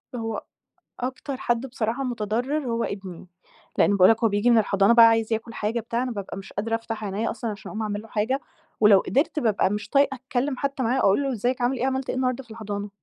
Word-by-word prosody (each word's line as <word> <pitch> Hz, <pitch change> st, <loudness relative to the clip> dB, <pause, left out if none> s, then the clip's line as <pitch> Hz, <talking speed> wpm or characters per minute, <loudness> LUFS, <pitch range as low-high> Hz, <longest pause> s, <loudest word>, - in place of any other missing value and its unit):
هو 225 Hz, -2 st, -4 dB, 0.6 s
أكتر 260 Hz, +2 st, -4 dB
حد 240 Hz, 0 st, -1 dB
بصراحة 240 Hz, +1 st, -2 dB
متضرر 245 Hz, +5 st, -2 dB
هو 230 Hz, 0 st, 0 dB
ابني، 190 Hz, -3 st, -6 dB, 0.5 s
لأن -, -, +4 dB
باقول 185 Hz, +1 st, +7 dB
لك 225 Hz, +1 st, +2 dB
هو 225 Hz, -, +5 dB
بييجي 205 Hz, +4 st, +2 dB
من 235 Hz, -, +6 dB
الحضانة 200 Hz, +1 st, +4 dB
بقى 235 Hz, -1 st, +9 dB
عايز 225 Hz, 0 st, +2 dB
ياكل 225 Hz, +1 st, -4 dB
حاجة 220 Hz, +3 st, -2 dB
بتاع، 235 Hz, +2 st, -2 dB
أنا 255 Hz, -, -3 dB
بابقى 200 Hz, -3 st, -6 dB
مش 195 Hz, -, -10 dB
قادرة 225 Hz, +3 st, -1 dB
أفتح 225 Hz, -1 st, -5 dB
عينيَّ 210 Hz, +3 st, -2 dB
أصلًا 230 Hz, -2 st, -4 dB
عشان 205 Hz, -, -9 dB
أقوم 220 Hz, -, -4 dB
أعمل 210 Hz, -1 st, -3 dB
له 225 Hz, -, -14 dB
حاجة، 230 Hz, +6 st, -1 dB, 0.4 s
ولو 210 Hz, -2 st, +7 dB
قدرت 275 Hz, -, 0 dB
بابقى 215 Hz, -7 st, +2 dB
مش 210 Hz, +1 st, -4 dB
طايقة 280 Hz, -1 st, +3 dB
أتكلم 260 Hz, +1 st, -2 dB
حتى 275 Hz, -1 st, -2 dB
معاه 250 Hz, +3 st, +1 dB
أقول 200 Hz, +9 st, +3 dB
له 270 Hz, -, -1 dB
إزيك 245 Hz, +3 st, -1 dB
عامل 250 Hz, +2 st, +1 dB
إيه 255 Hz, -, 0 dB
عملت 265 Hz, 0 st, -1 dB
إيه -, -, -1 dB
النهارده 255 Hz, 0 st, -1 dB
في 230 Hz, -, -17 dB
الحضانة، 205 Hz, -2 st, -5 dB
230 Hz, 225 wpm, -25 LUFS, 210-255 Hz, 0.6 s, بقى